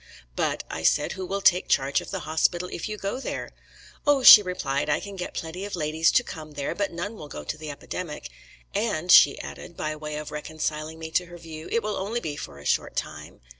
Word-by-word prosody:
'But,' -, -, -1 dB
I -, -, -5 dB
said, -, -, +2 dB
'who 185 Hz, -1 st, -5 dB
will 200 Hz, +2 st, -2 dB
take 180 Hz, -1 st, +4 dB
charge 135 Hz, 0 st, +2 dB
of -, -, -10 dB
the 190 Hz, -2 st, -4 dB
hospital 160 Hz, +3 st, +1 dB
if 170 Hz, -, -4 dB
you 210 Hz, -, -4 dB
go 200 Hz, +5 st, -3 dB
there?' -, -, -5 dB, 0.6 s
"'Oh,' 285 Hz, -2 st, +4 dB
she 215 Hz, -, +12 dB
replied, 150 Hz, -7 st, -2 dB
'I 145 Hz, -, +2 dB
can 200 Hz, -1 st, -8 dB
get 180 Hz, -1 st, -6 dB
plenty 165 Hz, +3 st, -5 dB
of 205 Hz, -1 st, -4 dB
ladies 160 Hz, 0 st, +2 dB
to 250 Hz, -, +4 dB
come 155 Hz, -8 st, -9 dB
there, 140 Hz, -1 st, -3 dB
but 200 Hz, -1 st, -2 dB
none 175 Hz, +6 st, -4 dB
will 150 Hz, -, -9 dB
go 75 Hz, -, -8 dB
to -, -, -4 dB
the 155 Hz, 0 st, -8 dB
epidemic. 150 Hz, +2 st, -6 dB, 0.4 s
And', 195 Hz, -5 st, 0 dB
she 140 Hz, -, +8 dB
added, 170 Hz, -, -9 dB
by 155 Hz, 0 st, -2 dB
way 150 Hz, 0 st, -6 dB
of 150 Hz, 0 st, -6 dB
reconciling 155 Hz, +1 st, -4 dB
me 160 Hz, 0 st, -7 dB
to 180 Hz, +2 st, +1 dB
her 175 Hz, 0 st, -11 dB
view, 160 Hz, -1 st, -9 dB
'it 230 Hz, -, +1 dB
will 210 Hz, -1 st, -2 dB
only 210 Hz, +5 st, -2 dB
be 155 Hz, -9 st, -4 dB
for 70 Hz, -, -8 dB
a 70 Hz, -, -13 dB
short -, -, 0 dB
time.' -, -, -6 dB
165 Hz, 230 wpm, -26 LUFS, 150-195 Hz, 0.6 s, she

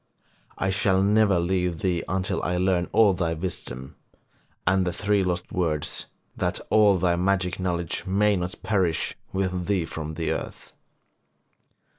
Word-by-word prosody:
I 95 Hz, -, 0 dB
shall 95 Hz, 0 st, +2 dB
never 100 Hz, -2 st, +4 dB
leave 90 Hz, -1 st, 0 dB
thee 90 Hz, -4 st, 0 dB
until 95 Hz, +1 st, -1 dB
I 90 Hz, 0 st, -1 dB
learn 90 Hz, -1 st, +1 dB
all 105 Hz, -4 st, +5 dB
thy 85 Hz, -2 st, -1 dB
wisdom, 70 Hz, -7 st, -6 dB, 0.7 s
and 95 Hz, +1 st, +3 dB
the 90 Hz, -, -1 dB
three 100 Hz, +2 st, +1 dB
lost 90 Hz, -1 st, -2 dB
words, 80 Hz, -6 st, -1 dB, 0.3 s
that -, -, -1 dB
all 105 Hz, -3 st, +5 dB
thy 90 Hz, -1 st, +2 dB
magic 90 Hz, 0 st, 0 dB
knowledge 85 Hz, -3 st, -2 dB
may 105 Hz, +2 st, +3 dB
not 90 Hz, +1 st, -3 dB
perish 90 Hz, -7 st, 0 dB, 0.2 s
with 95 Hz, -2 st, -2 dB
thee 95 Hz, -5 st, +1 dB
from 80 Hz, -1 st, -6 dB
the 80 Hz, 0 st, -1 dB
earth.' -, -, -6 dB
90 Hz, 145 wpm, -25 LUFS, 85-95 Hz, 0.7 s, all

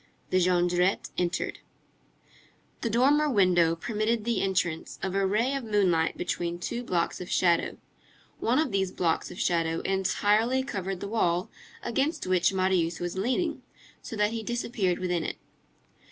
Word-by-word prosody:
The 185 Hz, -, +4 dB
Jondrette 180 Hz, +1 st, +2 dB
entered. 175 Hz, -1 st, -2 dB, 1.2 s
The 230 Hz, -, -1 dB
dormer 285 Hz, +7 st, +3 dB
window 180 Hz, -, +4 dB
permitted 215 Hz, +4 st, -1 dB
the 235 Hz, -3 st, 0 dB
entrance 185 Hz, -4 st, -1 dB
of 190 Hz, -, -1 dB
a 195 Hz, 0 st, +2 dB
ray 225 Hz, +7 st, +1 dB
of 275 Hz, -2 st, -2 dB
moonlight 190 Hz, -7 st, +1 dB
between 175 Hz, -1 st, -2 dB
two 235 Hz, +7 st, -4 dB
blocks 175 Hz, -6 st, -1 dB
of 180 Hz, -, -7 dB
shadow. 170 Hz, -2 st, +2 dB, 0.6 s
One 235 Hz, +3 st, +1 dB
of 305 Hz, -5 st, +1 dB
these 190 Hz, -2 st, 0 dB
blocks 165 Hz, -2 st, 0 dB
of -, -, -9 dB
shadow 165 Hz, -2 st, +1 dB
entirely 205 Hz, +6 st, +1 dB
covered 195 Hz, -7 st, -4 dB
the -, -, -4 dB
wall 180 Hz, -5 st, 0 dB, 0.3 s
against 275 Hz, +7 st, -1 dB
which 180 Hz, -2 st, +3 dB
Marius 185 Hz, -3 st, +1 dB
was 175 Hz, 0 st, -3 dB
leaning, 260 Hz, -, -1 dB, 0.4 s
so -, -, -7 dB
that 210 Hz, 0 st, +2 dB
he 230 Hz, 0 st, -3 dB
disappeared 220 Hz, -5 st, -1 dB
within 180 Hz, -2 st, -1 dB
it. -, -, -4 dB
190 Hz, 150 wpm, -28 LUFS, 175-230 Hz, 1.2 s, The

